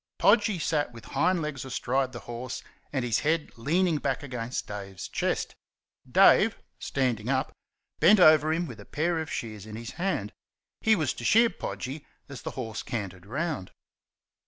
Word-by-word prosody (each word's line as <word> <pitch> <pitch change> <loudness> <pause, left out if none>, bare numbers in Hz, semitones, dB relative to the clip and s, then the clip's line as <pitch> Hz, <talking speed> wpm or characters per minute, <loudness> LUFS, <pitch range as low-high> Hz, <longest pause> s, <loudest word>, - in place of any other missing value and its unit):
Podgy 210 -1 +4
sat 155 -4 0
with 115 -2 -11
hind 180 -3 +2
legs 145 -4 -4
astride 130 0 -1
the 120 - -8
horse 120 +1 -6 0.3
and 135 -3 -1
his 115 -3 +2
head 160 +1 0
leaning 160 +6 +1
back - - -1
against 125 -3 -4
Dave's 100 -2 -7
chest. - - -1 0.6
Dave - - +6 0.2
(standing 125 -4 -1
up) 130 -1 +1 0.5
bent 190 +6 +7
over 155 -3 +7
him 170 +2 0
with 120 -8 -9
a 100 - -11
pair 165 +2 0
of 160 - -5
shears 110 -3 -5
in 110 - -7
his 115 +1 -6
hand. 145 - -1 0.5
He 220 0 +4
was 155 -8 0
to - - -9
shear 230 - +5
Podgy 135 +4 -5 0.2
as 140 -4 -8
the - - -4
horse 115 -4 -4
cantered 95 -5 -5
round. 140 - -3
135 Hz, 165 wpm, -28 LUFS, 115-160 Hz, 0.6 s, bent